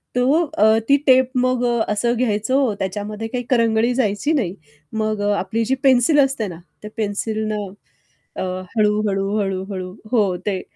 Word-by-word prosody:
तो 260 +6 +3 0.2
अ, 220 +2 +5
ती 280 - +6
टेप 260 -1 +5
मग 250 0 +1
अ, 240 -1 +1
असं 235 +3 +1
घ्यायचो, 245 +2 +1
त्याच्यामध्ये 210 +3 -4
काही 245 +2 -4
करंगळी 230 -1 +2
जायची 245 +4 0
नाही. 200 - -1 0.4
मग 215 -1 -1
अ, 205 0 +1
आपली 220 +5 -1
जी 260 +4 +1
पेन्सिल 265 +3 +4
असते 270 -6 +1
ना 170 -3 -8 0.2
त्या 210 - -9
पेन्सिल 215 +1 -2
न - - -1 0.8
अ, - - -2 0.3
हळू-हळू, 210 -2 +1
हळू-हळू 190 -1 -3 0.2
हो, 205 -7 +2
ते 195 -3 -1
220 Hz, 155 wpm, -20 LUFS, 205-250 Hz, 0.8 s, ती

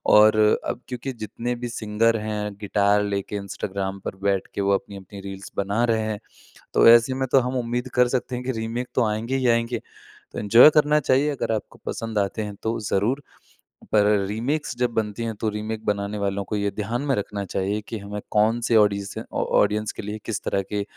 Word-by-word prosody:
और 110 0 +7 0.3
अब - - -3
क्योंकि 125 +1 -5
जितने 115 +2 -4
भी 120 0 -5
सिंगर 115 0 +1
हैं, 105 -1 -3
गिटार 100 0 +2
लेके 100 0 -3
इंस्टाग्राम 100 0 -4
पर - - -4
बैठ 100 -1 +1
के - - -1
वो 100 0 +2
अपनी-अपनी 100 0 -7
रील्स 95 0 -8
बना 100 +4 0
रहे 110 - +1
हैं, 110 -1 -3 0.5
तो - - +6
ऐसे 120 +2 +6
में 130 0 -1
तो 135 - +6
हम 125 +1 -3
उम्मीद 120 +2 -2
कर 125 - +6
सकते 125 0 -5
हैं 125 - -4
कि 130 - 0
रीमेक 120 +2 -3
तो 125 - +3
आएँगे 110 +5 -2
ही 130 - +1
आएँगे, 115 0 +1 0.5
तो - - -4
एन्जॉय 115 +7 +8
करना 150 0 +5
चाहिए 140 +1 +2
अगर 135 - -2
आपको 105 - -5
पसंद 115 -2 -4
आते 100 +2 -1
हैं 105 -1 -6
तो 115 +1 -1
ज़रूर। 110 +7 0 0.7
पर 105 -1 +5 0.2
रीमेक्स 135 +6 -2
जब 125 -1 +1
बनती 110 0 -2
हैं 115 -1 -3
तो 110 - 0
रीमेक 110 +1 -5
बनाने 100 0 -1
वालों 100 0 -1
को 105 - -3
ये 100 0 0
ध्यान 110 +6 -3
में 135 - +2
रखना 100 0 -3
चाहिए 100 +2 -2
कि 110 - -4
हमें 100 +1 -6
कौन 110 +3 +3
से 115 - +4
ऑडीसे 100 -2 +2
ऑ - - 0 0.2
ऑडियंस 105 +1 +1
के - - -7
लिए 105 +1 -5
किस 110 -1 -3
तरह 100 - 0
के 105 -1 0
110 Hz, 205 wpm, -24 LUFS, 100-120 Hz, 0.7 s, एन्जॉय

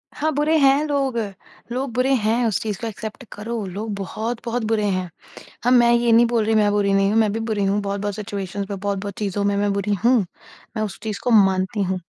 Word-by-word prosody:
हाँ, 310 +2 0
बुरे 300 +2 +2
हैं 275 +1 +4
लोग। 275 -4 0 0.5
लोग 260 0 -2
बुरे 255 +2 +2
हैं 230 +3 +2
उस 215 -5 +1
चीज 210 -3 -3
को 230 - -2
एक्सेप्ट 220 +4 -7
करो, 220 0 -4
लोग 205 +3 -5
बहुत-बहुत 225 +4 -3
बुरे 210 -2 +1
हैं। 185 -2 -2 0.6
हम 250 +1 +4
मैं 240 -1 +6
ये 235 -1 +3
नहीं 235 +1 +6
बोल 230 -2 +1
रही 220 +1 +1
मैं 210 -1 +4
बुरी 200 -1 +2
नहीं 195 0 +3
हूँ, 225 - +3
मैं 210 -2 +2
भी 225 - -2
बुरी 220 -3 -1
हूँ 200 +1 +1
बहुत-बहुत 200 0 -3
सिचुएशन्स 200 -1 -5
में, 200 - -3
बहुत-बहुत 200 0 -3
चीज़ों 200 -1 -2
में 200 0 +1
मैं 205 0 +1
बुरी 200 +1 0
हूँ, 250 +1 +5 0.6
मैं 215 - 0
उस 210 - -4
चीज़ 215 -2 -4
को 245 - +1
मानती 190 +2 0
हूँ। 185 -1 -1
215 Hz, 220 wpm, -22 LUFS, 200-235 Hz, 0.6 s, मैं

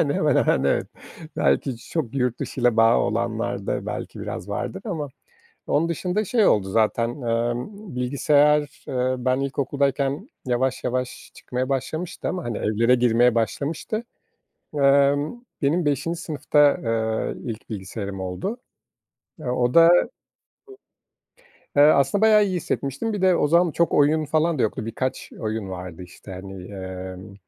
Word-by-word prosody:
Yani, 140 - 0
hemen 150 -3 +2
hemen, 65 - +2
evet. 70 - +1 0.5
Belki 70 - +1
çok 125 +1 -4
yurt 125 -3 0
dışıyla 120 -3 0
bağı 115 +1 +5
olanlarda 110 -2 -2
belki - - -5
biraz 90 - -6
vardır 190 - -4
ama 160 -9 -3 0.6
onun 165 +3 +1
dışında 180 +5 -1
şey 220 +1 +3
oldu 95 -2 +2
zaten, 115 +3 +2
emm, 120 - -3
bilgisayar, 145 +3 +2
ııı, 130 0 -1
ben 130 +1 +2
ilkokuldayken 140 - -1 0.2
yavaş 130 +1 0
yavaş 125 0 -3
çıkmaya 130 +1 -4
başlamıştı 155 +6 -3
ama, 180 -2 -3
hani, 120 -3 -3
evlere 115 +4 +2
girmeye 120 0 +3
başlamıştı. 150 - -2 0.7
Emm, 140 - +3 0.2
benim 160 +4 +1
5'inci 150 +4 0
sınıfta, 145 -2 +2
ııı, 110 -1 -1
ilk 115 -3 -6
bilgisayarım 100 -1 -5
oldu. 95 - -4 0.8
E, - - -10
o 125 0 0
da 165 0 +8 1.9
eee, 145 - +7
aslında 145 +6 +4
bayağı 215 -1 +6
iyi 190 -2 -1
hissetmiştim. 150 - -2
Bir 205 -3 -3
de 185 -2 +5
o 150 - +2
zaman 170 +2 +4
çok 170 +2 +1
oyun 150 +2 +3
falan 155 +1 +1
da - - +2
yoktu, 110 0 -1
birkaç 130 +3 -3
oyun 110 -2 -3
vardı, 90 -1 -7
işte, 90 +2 -12
hani, 95 0 -9
emm, 95 0 -7
130 Hz, 140 wpm, -23 LUFS, 115-155 Hz, 1.9 s, da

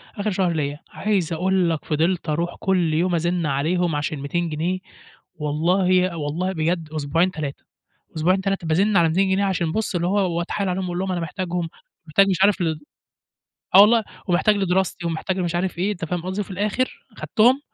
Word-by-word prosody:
آخر 210 0 -1
شهر 185 -2 +1
ليا. 145 -1 -2
عايز 190 -6 -1
أقول 185 +1 +1
لك 160 -2 -2
فضلت 165 +2 0
أروح 170 +3 -1
كل 180 -5 +1
يوم 175 +2 +1
أزن 170 0 0
عليهم 160 +4 0
عشان 150 0 -2
200 165 +4 -2
جنيه 170 +5 -2 0.6
والله 180 +4 +1
والله 160 +5 -2
بجد 165 -1 -1
أسبوعين، 165 +5 +1
3، 150 -4 -5 0.5
أسبوعين، 185 +5 +2
3 195 -3 -2
بازن 195 +6 +3
على 170 -1 +5
200 190 +4 +2
جنيه 195 +1 +2
عشان 170 -4 0
بُصّ 215 -1 -2
اللي 175 0 0
هو 185 -3 +1
وأتحايل 185 +3 -2
عليهم 185 +1 -2
أقول 175 0 -3
لهم: 190 0 -1
"أنا 175 -2 -2
محتاجهم،" 175 0 -3 0.4
محتاج 195 +6 +4
مش 185 - +1
عارف 200 -2 +3
ال 160 -2 -1 1.0
آه 195 - +10
والله 220 +1 +6 0.2
ومحتاج 205 +4 +3
لدراستي 190 -2 0
ومحتاج 170 +3 -2
لمش 175 -2 -1
عارف 180 0 -1
إيه، 195 +4 +1
أنت 175 -4 -5
فاهم 175 +1 -3
قصدي؟ 185 +3 -3
وفي 200 - -5
الآخر 210 +7 -2
أخدتهم 245 +4 +3
175 Hz, 185 wpm, -22 LUFS, 165-190 Hz, 1.0 s, آه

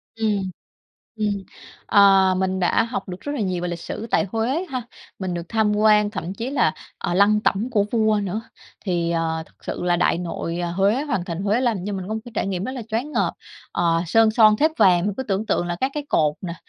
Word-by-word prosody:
Ừm, 210 -4 0 0.7
ừm. 205 -2 -1 0.4
Ờ, 195 -2 +5
mình 190 0 -1
đã 175 - +3
học 235 -2 -4
được 180 0 -7
rất 290 - -4
là 290 - -3
nhiều 185 -3 -1
về 180 - -1
lịch 175 - -4
sử 225 - -6
tại - - +2
Huế 250 +10 0
ha, 255 -2 -2 0.4
mình 185 -2 -3
được 170 - -3
tham 215 -2 +1
quan, 210 -1 +4
thậm 180 -2 -5
chí 230 +6 -4
là, 245 - +2 0.3
ờ, 175 - -2
lăng 205 +3 +4
tẩm 215 +4 0
của 210 -5 +2
vua 215 -2 +2
nữa. 200 +3 -2 0.4
Thì, 175 -3 0
ờ, 165 -1 -1
thật - - -24
sự - - -4
là 175 -1 +2
Đại 170 -1 +2
Nội, 170 -1 -4
ờ, 175 -1 -2
Huế, 200 +8 +2
Hoàng 200 -12 -2
Thành 175 +1 -4
Huế 210 +5 +1
làm 240 -4 +1
cho 205 - -3
mình 190 -1 -5
có 215 - -2
một 220 - -3
cái 240 - -11
trải - - -1
nghiệm 190 -1 -2
rất 260 - -4
là 255 - -5
choáng 245 +8 -2
ngợp. 200 -7 +1 0.4
Ờ, 165 -1 +1
sơn 225 +4 +4
son 215 -1 +5
thếp 310 +5 +3
vàng, 185 - +4
cứ 265 - -2
tưởng 205 -2 -2
tượng 175 -4 0
là 175 - -2
các 265 - +1
cái 295 -1 -3
cột 150 -1 +2
nè, 170 -2 -4
200 Hz, 235 wpm, -22 LUFS, 180-225 Hz, 0.7 s, Ờ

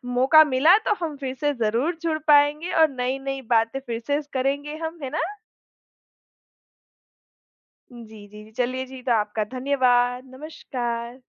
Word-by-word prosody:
मौका 270 +5 +7
मिला 300 +6 +4
तो - - +4
हम 305 -3 -5
फिर 265 -2 -5
से 290 -1 +1
ज़रूर 235 +8 -1
जुड़ 320 -2 -1
पाएँगे 295 +3 +4
और 315 - +6
नई-नई 270 +1 -3
बातें 225 +4 +1
फिर 235 -3 -5
से 290 +1 +1
करेंगे 280 +3 -2
हम, 325 +1 -6
है 260 - -3
ना? 305 - -3 2.7
जी, 240 -1 -11
जी, 215 -2 -13 0.2
जी। 215 - -18
चलिए 255 +1 -1
जी, 260 0 -11
तो 255 - -1
आपका 215 -1 0
धन्यवाद, 250 -2 +1
नमस्कार। 245 -4 -5
265 Hz, 145 wpm, -23 LUFS, 245-295 Hz, 2.7 s, मौका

